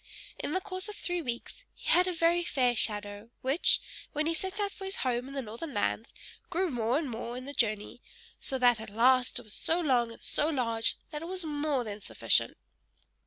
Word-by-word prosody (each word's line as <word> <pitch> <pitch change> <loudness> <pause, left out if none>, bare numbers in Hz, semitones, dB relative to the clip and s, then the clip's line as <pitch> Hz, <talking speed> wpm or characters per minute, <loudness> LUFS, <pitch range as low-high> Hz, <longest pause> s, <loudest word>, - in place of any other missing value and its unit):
In 295 - -2
the 375 - +1
course 370 +1 -3
of 420 - -6
three 355 -3 -1
weeks 245 - -5
he - - -11
had 360 +1 +5
a - - +1
very 340 0 +3
fair 250 -7 +2
shadow, 205 0 -1
which, 270 +6 +4 0.3
when 305 0 +1
he 330 - +1
set 380 +4 -3
out 405 -1 0
for 390 - -10
his 385 - -2
home 250 0 0
in 275 - -8
the 270 - -2
northern 240 +7 -7
lands, 210 +2 0 0.4
grew 360 0 0
more 240 +1 +1
and 310 -1 -1
more 235 0 -5
in 255 - -7
the 285 - -6
journey, 215 -1 0 0.4
so 265 - -2
that 245 -2 +4
at 220 - -8
last 250 +4 +4
it - - +1
was 215 - -7
so 330 +2 +1
long 250 -8 +2
and 230 - -13
so 295 - +1
large, 230 -6 +1
that 300 -1 -5
it 330 - -6
was 370 -1 -2
more 290 -3 0
than 210 -2 -6
sufficient. - - +2
265 Hz, 215 wpm, -30 LUFS, 235-335 Hz, 0.4 s, had